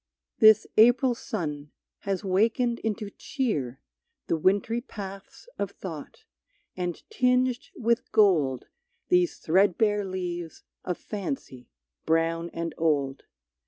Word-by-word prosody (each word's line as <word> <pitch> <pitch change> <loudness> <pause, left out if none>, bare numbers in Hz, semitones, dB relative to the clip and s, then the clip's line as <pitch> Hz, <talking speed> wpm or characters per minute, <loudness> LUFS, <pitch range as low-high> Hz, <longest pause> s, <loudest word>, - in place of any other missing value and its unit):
This 220 -1 +7
April 245 +3 +6
sun 150 -11 -5 0.3
has 195 0 -3
wakened 230 +5 +1
into 215 -1 -3
cheer 155 - -3 0.5
The - - 0
wintry 200 +8 +1
paths 200 - -9
of - - -1
thought, 450 -3 -9 0.5
and 180 -2 -4
tinged 250 0 +1
with 235 +2 0
gold 165 - +3 0.4
These 360 -1 +3
threadbare 205 +4 +2
leaves 175 -3 -5 0.2
of 180 -2 -3
fancy 200 - -6 0.4
brown 165 +1 +1
and 170 0 -4
old. 140 -4 0
195 Hz, 105 wpm, -27 LUFS, 165-235 Hz, 0.5 s, This